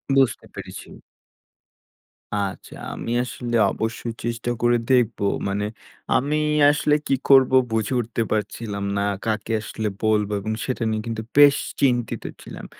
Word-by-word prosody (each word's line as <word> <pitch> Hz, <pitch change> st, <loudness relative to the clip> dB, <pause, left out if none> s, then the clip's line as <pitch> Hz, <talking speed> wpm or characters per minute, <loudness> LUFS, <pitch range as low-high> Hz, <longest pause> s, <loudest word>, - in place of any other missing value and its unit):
বুঝতে 135 Hz, -2 st, +2 dB
পেরেছি। -, -, -9 dB, 1.5 s
আচ্ছা। 100 Hz, -2 st, -4 dB, 0.2 s
আমি -, -, -5 dB
আসলে 120 Hz, -1 st, -4 dB, 0.2 s
অবশ্যই 115 Hz, +1 st, -3 dB
চেষ্টা 120 Hz, +1 st, -3 dB
করে 120 Hz, 0 st, +4 dB
দেখবো। 120 Hz, -4 st, +2 dB, 0.2 s
মানে 100 Hz, +1 st, -1 dB, 0.5 s
আমি 145 Hz, +4 st, 0 dB, 0.3 s
আসলে 150 Hz, 0 st, +1 dB
কি -, -, +2 dB, 0.2 s
করবো 130 Hz, -1 st, +6 dB, 0.2 s
বুঝে 110 Hz, +3 st, 0 dB
উঠতে 115 Hz, 0 st, -3 dB
পারছিলাম 105 Hz, -1 st, -2 dB
না। -, -, +1 dB, 0.2 s
কাকে 110 Hz, 0 st, -2 dB
আসলে 110 Hz, 0 st, -4 dB, 0.2 s
বলবো 105 Hz, -1 st, +2 dB
এবং 110 Hz, +2 st, -2 dB
সেটা 130 Hz, -2 st, -2 dB
নিয়ে 110 Hz, 0 st, -1 dB
কিন্তু 110 Hz, -1 st, -3 dB
বেশ 145 Hz, -1 st, +8 dB, 0.2 s
চিন্তিত 120 Hz, -4 st, +1 dB, 0.2 s
ছিলাম। -, -, -9 dB
115 Hz, 130 wpm, -23 LUFS, 110-125 Hz, 1.5 s, বেশ